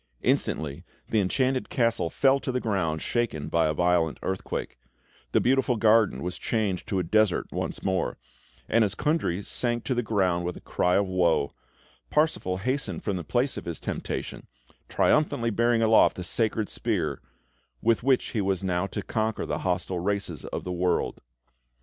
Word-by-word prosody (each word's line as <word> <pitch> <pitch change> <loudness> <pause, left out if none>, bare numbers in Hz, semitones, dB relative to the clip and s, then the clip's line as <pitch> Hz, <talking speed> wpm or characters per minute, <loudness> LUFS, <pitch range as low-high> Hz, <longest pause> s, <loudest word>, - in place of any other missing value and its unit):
Instantly 75 -2 0 0.3
the 110 - +2
Enchanted 130 +7 0
Castle 115 -8 +1
fell 135 +6 +3
to 130 - -3
the 125 - 0
ground, 90 -9 -1
shaken 110 -12 -1
by 80 -1 +2
a 75 - +1
violent 90 -2 +2
earthquake; 95 -8 -4 0.5
the - - +4
beautiful 130 0 +2
garden 110 -3 +3
was 90 0 -4
changed 105 -5 -1
to 95 - -1
a 90 - +1
desert 105 +2 +2
once - - -4
more; 95 -1 0 0.5
and 115 0 +4
as 105 - 0
Kundry 145 - 0
sank 120 +2 -1
to 130 - -1
the 120 - +1
ground 95 -6 +1
with 90 0 -3
a - - -12
cry 90 0 +1
of 100 - +3
woe, 85 -6 +1 0.6
Parsifal 150 - +1
hastened 130 +7 -2
from 100 - -1
the 90 - -4
place 125 - 0
of - - -6
his 85 -2 -4
temptation, - - -5 0.4
triumphantly 120 -6 +2
bearing 115 +1 +2
aloft 110 0 +5
the 90 - -5
sacred 110 +3 0
spear, - - -2 0.6
with 115 0 +2
which 130 0 +2
he 110 - -1
was 95 -1 0
now 90 0 0
to - - -5
conquer 110 0 -1
the - - -2
hostile 90 0 -1
races 95 -3 -2
of - - -5
the 90 - -4
world. 90 0 0
100 Hz, 170 wpm, -27 LUFS, 90-120 Hz, 0.6 s, aloft